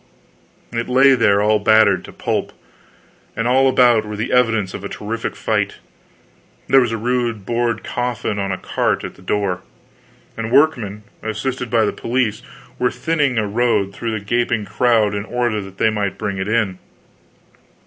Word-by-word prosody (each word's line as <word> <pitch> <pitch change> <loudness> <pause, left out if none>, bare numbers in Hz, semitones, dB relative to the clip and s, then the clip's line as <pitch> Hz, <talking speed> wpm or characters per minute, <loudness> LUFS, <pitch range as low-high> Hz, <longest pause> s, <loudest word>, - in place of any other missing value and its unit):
It 115 +1 -2
lay 135 +2 +6
there 100 -5 +3
all 105 0 +3
battered 110 -2 +4
to - - -11
pulp; - - -3 0.8
and 115 +1 -1
all 130 +2 +4
about 120 -4 +4
were 105 0 -6
the 110 +4 -3
evidences 110 -6 +2
of - - -7
a 100 - -5
terrific 115 +2 -4
fight. - - -1 0.9
There 135 +1 +6
was 120 -2 0
a 115 - -1
rude 120 -3 -1
board 115 -1 -1
coffin 120 -4 -2
on 100 -1 -2
a 95 - -2
cart - - -1
at - - -6
the - - -19
door, 95 -1 -1 0.7
and 115 -1 -4
workmen, 120 -8 +2 0.2
assisted 125 +3 -3
by 115 -2 +3
the - - -1
police, 115 -3 -1 0.4
were 125 - +2
thinning 145 -6 0
a 110 - +1
road 100 -3 +1
through 115 +1 -4
the 105 - -10
gaping 120 -1 0
crowd 110 +1 +2
in 100 0 -2
order 120 -2 -1
that 95 0 -11
they 110 - +2
might 100 -3 -2
bring 100 -1 -3
it 95 - -2
in. 105 -4 0
110 Hz, 170 wpm, -19 LUFS, 105-125 Hz, 0.9 s, lay